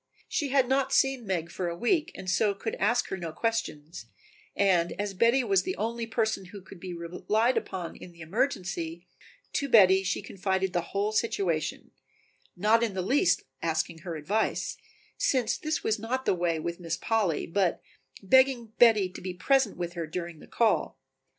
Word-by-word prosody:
She 290 - -1
had 265 -1 +3
not 265 +1 +1
seen 270 -5 +2
Meg 170 -3 -2
for 180 -1 -3
a 170 - -5
week 305 - +1
and 185 - -8
so 200 +2 +2
could 220 +3 -4
ask 235 +5 +1
her 190 - -3
no 170 -3 -5
questions, 165 - -3 0.5
and 180 -4 +2
as 205 -1 -3
Betty 235 +7 +3
was 390 +5 +3
the 370 +1 -3
only 230 +1 -3
person 220 -4 -1
who 200 +3 -10
could 185 0 -13
be 185 +1 -7
relied 180 +8 0
upon 180 -3 -4
in 180 - -11
the 170 -1 -16
emergency, 175 - -2 0.5
to 280 - -1
Betty 190 -5 +7
she 190 -1 -2
confided 190 -1 -1
the 175 - +1
whole 200 +4 -2
situation, 200 -8 -1 0.7
not 215 +5 +4
in 225 -5 -1
the 185 - -1
least 190 -4 +2 0.2
asking 165 0 -1
her 170 0 -6
advice, 195 +9 -1 0.4
since 255 -4 +2
this 310 0 -2
was 220 0 0
not 255 +4 -3
the - - +3
way 170 -2 0
with 170 +2 -4
Mistress 170 0 -5
Polly, 210 -9 +1
but 185 0 0 0.4
begging 250 0 +3
Betty 225 -5 +6
to 185 - -10
be 185 -1 -5
present 270 +7 +2
with 175 -1 -4
her 170 -2 -4
during 170 0 -5
the - - -14
call. 230 -2 +1
195 Hz, 180 wpm, -28 LUFS, 175-230 Hz, 0.7 s, Betty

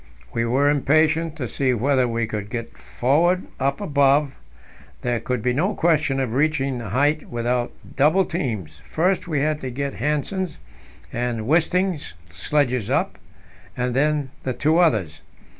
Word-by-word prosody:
We 115 0 0
were 130 +5 +2
impatient 155 +3 +2
to 135 -6 -4
see 130 +1 0
whether 130 +2 +2
we 115 -1 -1
could 105 -2 -5
get 115 0 -5
forward 170 +9 +1 0.2
up 135 +6 0
above. 140 -5 +2 0.7
There 120 -1 0
could 125 -2 -3
be 125 - +1
no 185 +10 0
question 155 -5 +2
of 130 -4 -1
reaching 140 -2 +1
the 115 -4 -6
height 145 +7 +1
without 120 +1 -1 0.2
double 155 +7 +4
teams; 105 - -4
first 175 - 0
we 150 -5 0
had 150 +1 0
to 130 - -4
get 140 +2 -3
Hanssen's 150 - -2 0.6
and 120 -1 -2
Wisting's 170 - +1 0.2
sledges 125 - 0
up, 150 - 0 0.6
and 125 0 -1
then 145 -1 +1
the 130 - -2
two 155 +6 +2
others. 105 - +1
140 Hz, 150 wpm, -22 LUFS, 120-155 Hz, 0.7 s, double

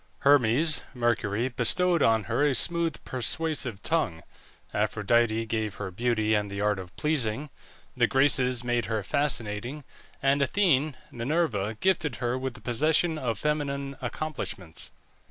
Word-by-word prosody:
Hermes 140 +3 +4
(Mercury) 120 -1 0
bestowed 170 +8 +2
on 110 -1 +3
her 120 - 0
a 145 -3 +3
smooth 170 +5 +2
persuasive 130 -3 0
tongue, 90 - -1 0.5
Aphrodite 110 +2 +1
gave 110 -3 -2
her 100 -2 -5
beauty 110 +1 0
and 105 -1 0
the 100 0 -5
art 105 -1 +1
of 90 -2 -10
pleasing; 145 -2 -1 0.4
the - - +3
Graces 130 -2 +3
made 120 -1 0
her 110 -2 -2
fascinating, 125 +1 -1 0.4
and 140 +1 +2
Athene 150 -2 +2
(Minerva) 115 - -1
gifted 170 -8 +1
her 120 0 -1
with 130 -1 -4
the 120 - -12
possession 155 +7 +1
of 115 -6 -2
feminine 140 0 -2
accomplishments. 120 - -5
125 Hz, 135 wpm, -27 LUFS, 110-150 Hz, 0.5 s, Hermes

